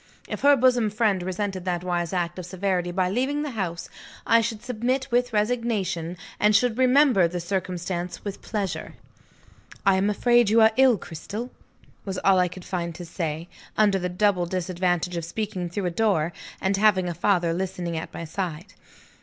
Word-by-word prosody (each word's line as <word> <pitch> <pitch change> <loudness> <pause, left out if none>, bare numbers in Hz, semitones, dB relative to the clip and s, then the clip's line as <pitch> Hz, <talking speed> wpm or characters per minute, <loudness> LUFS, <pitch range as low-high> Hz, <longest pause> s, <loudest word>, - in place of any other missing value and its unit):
If - - -5
her 285 0 +6
bosom 245 -4 +3
friend 210 -3 +1
resented 185 +1 -3
that 175 -1 -1
wise 175 -2 -1
act 175 -1 -2
of 180 - -7
severity 180 -1 -1
by 185 0 +1
leaving 270 +7 0
the 295 - -4
house, 180 -7 -4 0.4
I 230 +1 +5
should 225 -1 -3
submit 250 +2 -1
with 245 +1 +2
resignation, 210 -6 -1 0.2
and 210 0 +4
should 245 +1 +2
remember 255 - +5
the 175 +1 -4
circumstance 180 0 -3
with 200 -1 -5
pleasure. 200 -5 -4 0.9
"I 195 -1 +5
am 195 +2 +2
afraid 240 +1 +3
you 225 +2 +4
are 220 0 +7
ill, 260 -3 +5
Cristel?" 200 +9 -7 0.5
was 190 -2 -4
all 195 -1 +5
I 180 - +3
could 180 +1 -10
find 170 -2 -3
to 175 - -7
say, 165 -1 -4 0.3
under 205 -3 +4
the 180 0 -2
double 180 -1 +1
disadvantage 180 -1 -1
of 170 - -3
speaking 180 0 -4
through 190 +3 -3
a 175 - 0
door, 175 -4 +1 0.3
and 195 +1 0
having 200 -3 +3
a 175 - -2
father 175 -1 +1
listening 180 -1 -3
at 160 - -5
my 170 - -6
side. 170 -1 -5
190 Hz, 180 wpm, -25 LUFS, 175-220 Hz, 0.9 s, are